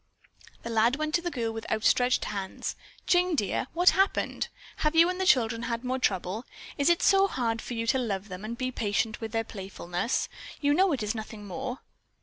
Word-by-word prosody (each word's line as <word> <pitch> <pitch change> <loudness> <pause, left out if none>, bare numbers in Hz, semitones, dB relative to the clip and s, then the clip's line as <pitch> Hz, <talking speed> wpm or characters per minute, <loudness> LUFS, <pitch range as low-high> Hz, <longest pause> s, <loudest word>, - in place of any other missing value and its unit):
The 235 - -4
lad 230 +3 +3
went 310 +1 -2
to 345 - +3
the 350 - -2
girl 235 -7 -2
with 225 0 -6
outstretched 245 +3 +3
hands. 195 -2 -4 0.3
"Jane, 360 -1 +3
dear, 205 -1 0
what 355 +2 +6
has - - -4
happened? 390 - +1 0.3
Have 305 +1 0
you 335 +2 +7
and 365 +1 -4
the 375 - +1
children 230 -6 +3
had 235 +1 -2
more 255 +1 -1
trouble? 195 -1 -1 0.3
Is 285 +3 +2
it 345 - +3
so 390 0 +5
hard 230 - -1
for 245 - -5
you 230 0 -2
to 260 +3 +2
love 205 -5 -2
them 185 0 -8
and 230 +2 -5
be 255 0 -2
patient 215 -1 -1
with 225 -1 -4
their 225 0 0
playfulness? 190 0 -3 0.3
You 290 -1 +3
know 375 +4 +4
it 260 -7 -1
is 210 +1 -1
nothing 220 -2 -7
more." 260 +5 -5
235 Hz, 210 wpm, -28 LUFS, 215-295 Hz, 0.3 s, you